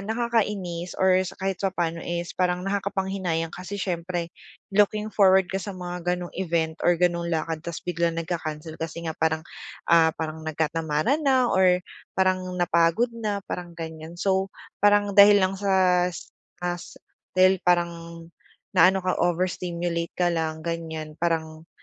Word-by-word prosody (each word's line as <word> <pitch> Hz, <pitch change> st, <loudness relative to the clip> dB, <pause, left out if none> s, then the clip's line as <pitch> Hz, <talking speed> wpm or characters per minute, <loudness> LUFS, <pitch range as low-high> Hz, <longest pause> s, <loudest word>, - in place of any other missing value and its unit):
nakakainis 205 Hz, -6 st, -2 dB
or 185 Hz, -1 st, +4 dB
sa 185 Hz, -, -5 dB
kahit 190 Hz, -1 st, -3 dB
papaano 175 Hz, -4 st, -1 dB
is 175 Hz, 0 st, -4 dB
parang 180 Hz, 0 st, 0 dB
nakakapanghinayang 190 Hz, -4 st, -2 dB
kasi 185 Hz, +3 st, -6 dB
siyempre, 175 Hz, -2 st, -3 dB, 0.4 s
looking 210 Hz, +1 st, +2 dB
forward 190 Hz, -2 st, +5 dB
ka 195 Hz, -, -1 dB
sa 200 Hz, -1 st, -6 dB
mga 180 Hz, -1 st, -5 dB
gano'ng 175 Hz, -1 st, -7 dB
event 165 Hz, -3 st, -1 dB
or 175 Hz, -, +3 dB
gano'ng 170 Hz, 0 st, +1 dB
lakad 160 Hz, -1 st, -2 dB
ta's 170 Hz, 0 st, -7 dB
biglang 170 Hz, -1 st, 0 dB
nagka-cancel 160 Hz, -2 st, -4 dB
kasi 165 Hz, +1 st, -5 dB
nga 160 Hz, -, -2 dB
parang, 160 Hz, 0 st, +1 dB, 0.4 s
ah, 165 Hz, -1 st, +5 dB
parang 160 Hz, 0 st, -4 dB
nagkatamaran 160 Hz, -, 0 dB
na 265 Hz, -4 st, +3 dB
or 185 Hz, -1 st, +5 dB, 0.4 s
parang 185 Hz, 0 st, +2 dB, 0.2 s
napagod 175 Hz, +7 st, +2 dB
na, 210 Hz, -4 st, -3 dB
parang 175 Hz, -1 st, -6 dB
ganiyan. 160 Hz, 0 st, -7 dB
So, 190 Hz, +1 st, +1 dB, 0.3 s
parang 205 Hz, 0 st, +4 dB
dahil 205 Hz, 0 st, +7 dB
lang 190 Hz, +1 st, -2 dB
sa 185 Hz, -3 st, +3 dB
as 175 Hz, -, -9 dB, 0.3 s
as 175 Hz, -1 st, -4 dB, 0.4 s
dahil 185 Hz, 0 st, +5 dB
parang 175 Hz, -1 st, +2 dB, 0.8 s
naano 185 Hz, 0 st, +5 dB
ka, 185 Hz, -, +2 dB
over 175 Hz, +1 st, +2 dB
stimulate 170 Hz, -2 st, -3 dB
ka 175 Hz, -1 st, +2 dB
lang, 160 Hz, -1 st, -2 dB
ganiyan, 160 Hz, -2 st, -4 dB
parang 160 Hz, -1 st, -2 dB
175 Hz, 145 wpm, -25 LUFS, 165-190 Hz, 0.8 s, dahil